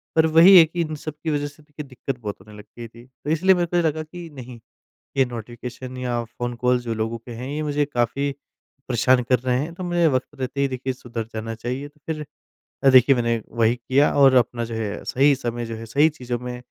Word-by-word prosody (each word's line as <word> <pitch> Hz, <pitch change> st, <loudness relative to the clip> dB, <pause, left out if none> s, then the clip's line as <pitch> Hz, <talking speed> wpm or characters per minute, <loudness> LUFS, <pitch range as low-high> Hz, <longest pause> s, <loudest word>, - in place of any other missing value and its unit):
पर 160 Hz, 0 st, +5 dB
वही 165 Hz, +4 st, +8 dB
है 170 Hz, -, +10 dB
कि 170 Hz, +2 st, -3 dB
इन 155 Hz, -1 st, -3 dB
सब 155 Hz, +1 st, -6 dB
की 160 Hz, -, -1 dB
वजह 145 Hz, -1 st, -1 dB
से 145 Hz, +1 st, -15 dB
देखिए 150 Hz, 0 st, -9 dB
दिक्कत 130 Hz, 0 st, -5 dB
बहुत 105 Hz, -3 st, -6 dB
होने 105 Hz, -1 st, -14 dB
लग 105 Hz, -, -11 dB
गई 120 Hz, -1 st, -7 dB
थी। 115 Hz, +2 st, -16 dB
तो 130 Hz, +2 st, -10 dB
इसलिए 185 Hz, +4 st, +4 dB
मेरे 175 Hz, -, +1 dB
को 175 Hz, -, -1 dB
ये 175 Hz, -, +3 dB
लगा 155 Hz, 0 st, 0 dB
कि 170 Hz, +2 st, -10 dB
नहीं, 125 Hz, -3 st, -10 dB, 0.6 s
ये 135 Hz, -, +5 dB
नोटिफ़िकेशन 125 Hz, +2 st, -8 dB
या 120 Hz, -2 st, -2 dB
फ़ोन 120 Hz, +1 st, -5 dB
कॉल 125 Hz, +1 st, +2 dB
जो 120 Hz, -2 st, -4 dB
लोगों 110 Hz, +1 st, -2 dB
के 120 Hz, +2 st, -12 dB
हैं 120 Hz, +3 st, -6 dB
ये 150 Hz, +2 st, -3 dB
मुझे 145 Hz, -1 st, 0 dB
काफ़ी 140 Hz, +1 st, -1 dB, 0.6 s
परेशान 125 Hz, +1 st, +3 dB
कर 125 Hz, 0 st, +2 dB
रहे 125 Hz, 0 st, 0 dB
हैं। 155 Hz, +5 st, -4 dB
तो 185 Hz, -, -7 dB
मुझे 175 Hz, -1 st, +2 dB
वक़्त 130 Hz, -4 st, 0 dB
रहते 130 Hz, +2 st, -2 dB
ही 140 Hz, -, +3 dB
देखिए 130 Hz, 0 st, -3 dB
सुधर 120 Hz, -2 st, -6 dB
जाना 115 Hz, +1 st, -4 dB
चाहिए। 125 Hz, +5 st, -4 dB
तो 150 Hz, +1 st, -23 dB
फिर 155 Hz, -2 st, -4 dB, 0.6 s
अ, 135 Hz, -, +7 dB
देखिए 130 Hz, +1 st, +7 dB
मैंने 115 Hz, -2 st, 0 dB, 0.2 s
वही 115 Hz, +1 st, +4 dB
किया 130 Hz, +4 st, +2 dB
और 135 Hz, -2 st, +6 dB
अपना 120 Hz, -1 st, +2 dB
जो 115 Hz, -, -7 dB
है 105 Hz, -2 st, -4 dB
सही 140 Hz, +2 st, +3 dB
समय 120 Hz, -2 st, -4 dB
जो 115 Hz, 0 st, -5 dB
है 115 Hz, +1 st, -8 dB
सही 145 Hz, +7 st, +3 dB
चीज़ों 125 Hz, -5 st, -5 dB
में 125 Hz, 0 st, -6 dB
130 Hz, 240 wpm, -23 LUFS, 120-150 Hz, 0.6 s, है